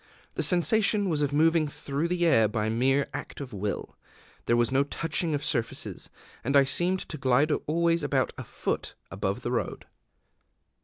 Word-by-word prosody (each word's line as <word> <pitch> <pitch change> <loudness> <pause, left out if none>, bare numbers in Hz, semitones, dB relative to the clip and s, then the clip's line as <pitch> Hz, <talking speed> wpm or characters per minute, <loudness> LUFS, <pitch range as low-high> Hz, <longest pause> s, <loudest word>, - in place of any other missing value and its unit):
The - - -2
sensation 200 +2 +3
was 155 -3 0
of 145 -1 +1
moving 160 +1 +3
through 145 +2 -3
the 175 0 0
air 115 -10 +5
by 105 +1 -1
mere 135 +5 +2
act - - -7
of 135 -4 -7
will: 100 +1 -4 0.5
there 120 - +3
was 120 +1 +2
no 135 +1 +3
touching 160 +2 -2
of 145 +1 -3
surfaces; 120 -6 -2 0.3
and 140 +4 +3
I 140 - +7
seemed 175 +7 0
to 155 - -7
glide 135 +4 +3 0.2
always 170 +2 +2
about 140 -4 0
a - - -7
foot - - -4 0.2
above 100 +4 -3
the 120 - -2
road. 125 - -3
145 Hz, 170 wpm, -27 LUFS, 120-165 Hz, 0.5 s, I